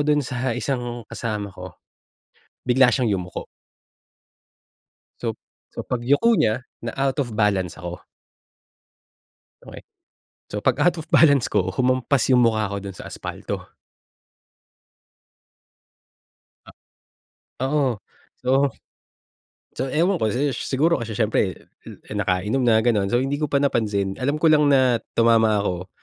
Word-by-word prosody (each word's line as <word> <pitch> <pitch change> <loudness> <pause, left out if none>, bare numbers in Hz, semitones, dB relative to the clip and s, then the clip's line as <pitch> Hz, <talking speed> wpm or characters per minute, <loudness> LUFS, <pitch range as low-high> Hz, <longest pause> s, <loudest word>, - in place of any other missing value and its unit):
dun 150 -1 +3
sa 125 0 -2
isang 120 -1 -3
kasama 105 -3 -4
ko 90 0 -10 0.9
bigla 125 +1 +4
siyang 120 -6 +1
yumuko. 90 -1 -6 1.8
So - - -1 0.4
so, - - -4
pagyuko 135 - +2
niya 110 +3 +1 0.2
na 115 - -4
out 135 -1 0
of 120 -6 -2
balance 100 -5 +1
ako. 90 -1 -7 1.7
Okey, - - -10 0.7
so 105 0 -5
pag-out 145 +7 +2
of 160 - -22
balance 140 -6 +5
ko 100 -3 0
humampas 130 +1 +1
yung 125 -1 +5
mukha 110 -2 0
ko 100 - -3
dun 100 -1 -8
sa - - -10
aspalto. - - -6 3.0
A - - -12 1.0
Oo, 135 -7 0 0.4
so 135 +2 +2 1.0
so 130 - -2
ewan 175 +5 +2
ko 110 - +2
si 140 +2 0
ish - - -5
siguro 155 +6 +2
kasi 115 -1 -5
siyempre, 105 -4 +1 0.3
eh, - - -11 0.2
eh, - - -6
nakainom 105 +5 0
na 115 -2 +4
ganon, 110 -4 +1
so 120 - +3
hindi 135 +2 -1
ko 150 - 0
pa 140 - +3
napansin 105 -8 0
alam 145 +3 0
ko 165 - +3
lang 150 -2 +5
na 130 -4 +4 0.2
tumama 115 -2 +4
ako, 90 -2 -3
120 Hz, 130 wpm, -23 LUFS, 105-135 Hz, 3.0 s, balance